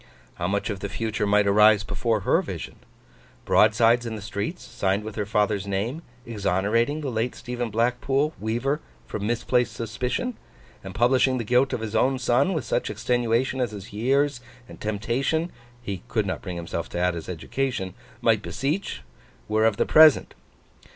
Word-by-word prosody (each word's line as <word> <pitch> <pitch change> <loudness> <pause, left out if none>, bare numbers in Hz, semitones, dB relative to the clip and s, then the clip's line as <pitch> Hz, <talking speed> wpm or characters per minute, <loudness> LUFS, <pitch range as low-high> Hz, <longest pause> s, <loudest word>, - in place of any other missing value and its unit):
How 85 - -3
much 100 +3 -1
of 100 - -5
the 100 - -4
future 110 0 -2
might 105 0 +4
arise 105 +1 +5
before 115 -2 -1
her - - +3
vision? - - -7 0.7
Broadsides 115 +3 +4
in 115 -2 -4
the 105 - -7
streets, 105 - -4
signed 100 +2 -1
with 110 0 -6
her 105 -2 -2
father's 105 -2 0
name, 105 +10 -2 0.2
exonerating 110 +6 0
the 140 -3 -3
late 115 +2 -1
Stephen 120 -1 -4
Blackpool, 125 +6 +1
weaver, 120 +7 -1 0.3
from 105 0 -4
misplaced 120 0 +1
suspicion, 125 - -3 0.5
and 95 -1 -8
publishing 130 +2 +3
the 120 - -2
guilt 125 +4 +2
of - - -2
his 110 0 -4
own 130 +4 +3
son, 130 +8 +2
with 155 -8 -2
such - - -1
extenuation 120 +3 0
as 125 - +1
his 100 0 -9
years 135 +4 +1 0.3
and - - -13
temptation 125 - -1 0.3
(he 100 -4 -4
could 110 -3 0
not 95 - -3
bring 90 -3 -6
himself 85 0 -4
to - - -5
add, 90 0 +2
his 85 0 -7
education) 95 +2 -3 0.3
might - - +3
beseech; 150 +9 -3 0.4
were 110 +1 +2
of 105 -2 0
the - - +2
Present. 155 -1 +6
115 Hz, 170 wpm, -25 LUFS, 105-125 Hz, 0.7 s, Present